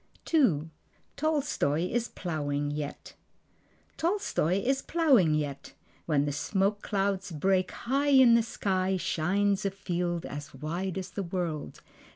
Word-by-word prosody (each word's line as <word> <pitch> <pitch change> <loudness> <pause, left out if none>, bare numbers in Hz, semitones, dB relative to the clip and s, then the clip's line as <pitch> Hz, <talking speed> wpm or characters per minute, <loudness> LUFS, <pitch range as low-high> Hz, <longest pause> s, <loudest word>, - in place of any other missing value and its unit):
II. 165 - +3 0.4
Tolstoi 280 - 0
Is 240 0 0
Plowing 145 -4 -3
Yet 145 -1 -6 0.8
Tolstoi 330 - 0
is 270 +1 +1
plowing 265 - +3
yet. 145 -2 -4 0.3
When 145 -3 +2
the 145 - -1
smoke 195 +7 0
clouds 195 -1 -1
break, 185 +4 +1
High 275 +4 -1
in 260 -4 +7
the 230 - +6
sky 190 -4 -1
shines 195 +4 +1
a 195 - +1
field 175 -3 -3
as 145 0 -7
wide 170 +7 -3
as 190 - -5
the 200 - -3
world. 170 -5 -4
185 Hz, 130 wpm, -29 LUFS, 155-230 Hz, 0.8 s, in